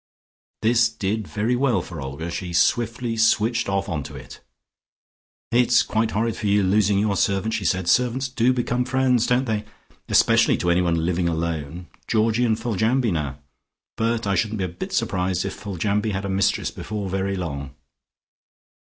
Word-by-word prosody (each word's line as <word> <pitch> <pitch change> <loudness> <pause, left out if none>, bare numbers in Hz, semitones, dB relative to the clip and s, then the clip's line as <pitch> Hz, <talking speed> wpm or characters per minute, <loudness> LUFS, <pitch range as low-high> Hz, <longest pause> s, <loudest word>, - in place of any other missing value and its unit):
This 115 +1 +4
did 110 -1 -3
very 110 +4 0
well 120 -8 +1
for 80 -5 -8
Olga: 70 +6 -5
she 90 0 -5
swiftly 115 +5 +1
switched 115 0 +2
off 95 0 -1
onto 80 -8 -4
it. - - -11 1.1
"It's 120 0 +4
quite 110 0 0
horrid 115 +1 -1
for 110 -3 -3
you 100 0 +3
losing 100 +1 +3
your 100 0 +1
servant," 100 +3 0
she 100 - -2
said. 95 +1 0
"Servants 125 +5 +2
do 125 -1 +2
become 125 0 0
friends, 125 -2 +1
don't 125 +2 +2
they, 110 -3 -1 0.5
especially - - +4
to 90 - 0
anyone 85 -2 +1
living 85 0 0
alone. 80 0 -3 0.2
Georgie 115 +2 +2
and 110 -2 +1
Foljambe, 115 +1 +1
now! 70 -4 -3 0.6
But 115 0 -1
I 100 - +1
shouldn't 105 +5 0
be 95 - -2
a - - -1
bit 85 - -7
surprised 90 0 0
if 100 - -3
Foljambe 105 +2 -2
had 95 +1 -3
a - - -3
mistress 95 +1 +1
before 105 -2 -5
very 95 +1 -1
long." 70 -6 -5
105 Hz, 165 wpm, -23 LUFS, 90-115 Hz, 1.1 s, This